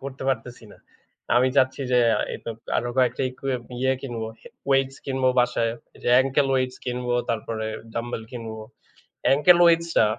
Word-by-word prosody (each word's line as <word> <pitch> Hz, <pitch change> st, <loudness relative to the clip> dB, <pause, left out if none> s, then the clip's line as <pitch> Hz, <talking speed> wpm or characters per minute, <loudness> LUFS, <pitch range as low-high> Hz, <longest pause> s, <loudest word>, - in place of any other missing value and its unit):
করতে 135 Hz, -1 st, -7 dB
পারতেসি 120 Hz, -2 st, -3 dB
না।" -, -, -17 dB, 0.6 s
আমি 130 Hz, +1 st, +4 dB
চাচ্ছি, 130 Hz, +1 st, +3 dB
যে 125 Hz, -, +5 dB, 0.2 s
আ -, -, 0 dB
ইকু -, -, -6 dB, 0.3 s
আরো 120 Hz, -, -1 dB
কয়েকটা 125 Hz, +1 st, +2 dB
ইকুইপ 130 Hz, -1 st, -4 dB, 0.2 s
ইয়ে 130 Hz, +1 st, +2 dB
কিনবো, 115 Hz, -4 st, -4 dB, 0.4 s
ওয়েটস 135 Hz, 0 st, +2 dB
কিনব 130 Hz, -1 st, -2 dB
বাসায় 120 Hz, -2 st, +2 dB, 0.3 s
যে, -, -, -1 dB
অ্যাঙ্কেল 135 Hz, +2 st, +3 dB
ওয়েটস 130 Hz, -1 st, 0 dB
কিনবো, 125 Hz, -1 st, -2 dB, 0.2 s
তারপরে 110 Hz, 0 st, -3 dB, 0.3 s
ডাম্বেল 115 Hz, -1 st, -3 dB
কিনবো। 110 Hz, -2 st, -6 dB, 0.6 s
অ্যাঙ্কেল 150 Hz, +6 st, +6 dB
ওয়েটস 170 Hz, 0 st, +4 dB
টা 110 Hz, -, +6 dB
125 Hz, 155 wpm, -24 LUFS, 120-135 Hz, 0.6 s, অ্যাঙ্কেল